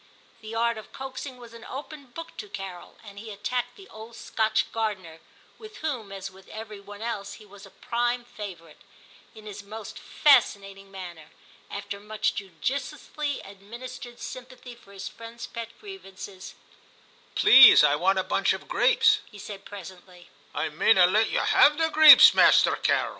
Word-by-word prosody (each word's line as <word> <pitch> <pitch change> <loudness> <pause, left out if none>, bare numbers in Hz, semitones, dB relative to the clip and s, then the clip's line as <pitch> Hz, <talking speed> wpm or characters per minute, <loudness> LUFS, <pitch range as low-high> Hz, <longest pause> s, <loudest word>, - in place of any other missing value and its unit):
The 220 +1 -8
art 235 0 0
of 215 - -14
coaxing 265 0 -8
was 240 -2 -14
an 230 -1 -12
open 285 +1 -9
book 330 +7 -10
to 210 - -8
Carol, 195 -3 -9
and 200 -2 -12
he 220 +1 -10
attacked 240 +4 -4
the 390 -1 -15
old 220 +2 -12
Scotch 220 -1 -1
gardener, 195 -8 -4 0.2
— - - -30
with 435 -1 -12
whom, 255 -10 -5
as 195 0 -7
with 190 0 -18
every 215 -1 -9
one 205 +2 -11
else, 210 -4 -5
he 215 - -14
was 200 0 -15
a - - -17
prime 240 +3 -2
favourite, 190 -8 -10 0.3
— - - -26
in 215 -1 -14
his 205 -1 -8
most 210 +1 -10
fascinating 200 -8 +1
manner. 175 -5 -10 0.4
After 200 0 -7
much 210 +1 -2
judiciously 275 - -5
administered 235 +5 -11
sympathy 250 -1 -10
for 235 -4 -19
his 195 -1 -8
friend's 230 0 -10
pet 230 -1 -8
grievances, 195 - -11 0.4
' - - -31
Please, 265 - +8
I 145 -1 +4
want 190 +5 +1
a 190 - +1
bunch - - +1
of - - -8
grapes,' 450 -3 +3
he 210 - -14
said 200 -1 -10
presently. 185 -2 -12
' - - -31
I - - -2
mayna 190 -5 +4
let 215 +5 +2
ye - - -1
have 295 0 +4
the 325 0 +1
greeps, 310 -1 +9
Masterrr - - +4
Carrel.' - - +1
220 Hz, 175 wpm, -25 LUFS, 195-250 Hz, 0.4 s, greeps